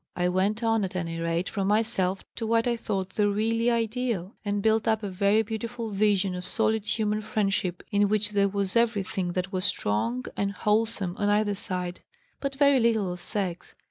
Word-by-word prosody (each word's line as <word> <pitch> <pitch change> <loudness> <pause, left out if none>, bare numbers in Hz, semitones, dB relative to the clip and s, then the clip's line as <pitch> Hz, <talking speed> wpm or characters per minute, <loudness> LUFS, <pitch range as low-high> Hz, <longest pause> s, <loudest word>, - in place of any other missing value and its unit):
I 180 0 +1
went 200 +5 0
on, 225 -2 +2
at 190 -1 -4
any 165 -2 -3
rate, 170 +2 -1
from 195 -2 -2
myself 200 -3 +1
to 225 - -2
what 230 0 +2
I 240 - +2
thought 195 -4 -3
the 205 +2 +1
really 225 +3 +1
ideal 230 -4 -1
and 205 -1 -1
built 220 0 +2
up 220 -1 +2
a 205 - -2
very 200 +3 +2
beautiful 225 +1 -4
vision 200 -2 +2
of 180 0 -5
solid 220 +1 0
human 215 -1 0
friendship 195 -4 -1
in 205 0 +3
which 210 0 +1
there 200 -1 +2
was 200 0 -1
everything 200 -6 +1
that 185 +1 -2
was 185 0 -1
strong 115 - 0
and 200 0 -1
wholesome 210 -3 0
on 205 0 +2
either 205 0 +2
side, 180 -3 -4 0.4
but 275 -1 -3
very 280 -1 +5
little 220 -5 +2
of 180 - -9
sex. 185 -3 -4
205 Hz, 190 wpm, -27 LUFS, 185-220 Hz, 0.4 s, very